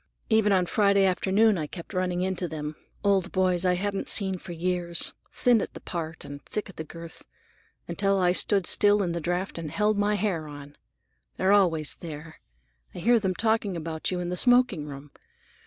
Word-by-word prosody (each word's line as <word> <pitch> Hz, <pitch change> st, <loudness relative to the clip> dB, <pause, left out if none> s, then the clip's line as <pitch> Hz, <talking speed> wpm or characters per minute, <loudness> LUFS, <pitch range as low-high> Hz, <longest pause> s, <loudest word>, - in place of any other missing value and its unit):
Even 220 Hz, -1 st, +4 dB
on 185 Hz, -2 st, +3 dB
Friday 200 Hz, +1 st, +3 dB
afternoon 195 Hz, +2 st, +2 dB
I 155 Hz, -, -3 dB
kept 170 Hz, +5 st, -10 dB
running 180 Hz, -1 st, -1 dB
into 185 Hz, -1 st, -2 dB
them, 150 Hz, -1 st, -5 dB, 0.3 s
old 195 Hz, -2 st, +2 dB
boys 185 Hz, -1 st, +1 dB
I 180 Hz, -, +3 dB
hadn't 195 Hz, +2 st, -2 dB
seen 190 Hz, -3 st, +1 dB
for 175 Hz, -, -9 dB
years, 175 Hz, 0 st, -1 dB, 0.2 s
thin 240 Hz, -3 st, +3 dB
at -, -, -6 dB
the -, -, -7 dB
part 165 Hz, -2 st, -6 dB
and 145 Hz, 0 st, -9 dB
thick 210 Hz, -1 st, -5 dB
at 195 Hz, -, -13 dB
the 160 Hz, -, -4 dB
girth, 165 Hz, +1 st, -11 dB, 0.6 s
until 195 Hz, +3 st, 0 dB
I 180 Hz, -1 st, +3 dB
stood 195 Hz, +1 st, +3 dB
still 205 Hz, 0 st, +4 dB
in 175 Hz, -, -1 dB
the 170 Hz, 0 st, -3 dB
draft 175 Hz, +2 st, -2 dB
and 160 Hz, -2 st, -5 dB
held 210 Hz, +5 st, +1 dB
my 205 Hz, +1 st, +2 dB
hair 185 Hz, -6 st, -1 dB
on. 145 Hz, -1 st, -11 dB, 0.6 s
They're 190 Hz, +2 st, +3 dB
always 165 Hz, -7 st, +2 dB
there; 155 Hz, -1 st, -9 dB, 0.6 s
I -, -, -7 dB
hear 235 Hz, +1 st, +3 dB
them 190 Hz, -3 st, -1 dB
talking 220 Hz, -4 st, 0 dB
about 160 Hz, -1 st, -4 dB
you 180 Hz, -, -2 dB
in 175 Hz, 0 st, -3 dB
the 180 Hz, -, -3 dB
smoking 245 Hz, -11 st, +3 dB
room. 140 Hz, 0 st, -10 dB
185 Hz, 190 wpm, -26 LUFS, 165-200 Hz, 0.6 s, Even